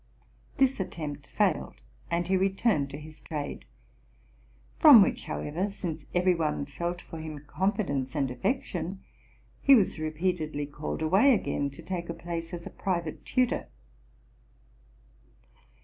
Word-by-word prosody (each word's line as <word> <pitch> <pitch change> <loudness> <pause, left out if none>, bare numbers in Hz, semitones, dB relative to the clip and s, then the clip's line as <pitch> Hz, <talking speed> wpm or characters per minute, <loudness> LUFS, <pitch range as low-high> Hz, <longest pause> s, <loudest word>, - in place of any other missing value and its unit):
This 270 -2 +3
attempt 155 -6 -5
failed; - - 0 0.3
and 170 0 0
he 190 - +2
returned 190 -5 +2
to 140 - -7
his 155 +1 -12
trade, 150 -3 -5 1.1
from 280 - +10
which, - - -2
however, 160 +5 -2
since 165 -6 -5
every 180 +1 +4
one 155 -4 -1
felt 170 +5 -4
for 165 - -8
him 155 -2 -7
confidence 150 - -1
and 135 -4 0
affection, 180 - -2 0.6
he 275 - +8
was 200 -8 +2
repeatedly 155 -1 -1
called 150 +2 -5
away, 205 - +5
again 145 -8 -1
to 140 - -12
take 175 -2 -4
a 170 - -3
place 170 -1 -5
as 170 -1 -6
private 170 -5 -2
tutor. 255 -2 +1
170 Hz, 130 wpm, -28 LUFS, 150-190 Hz, 1.1 s, from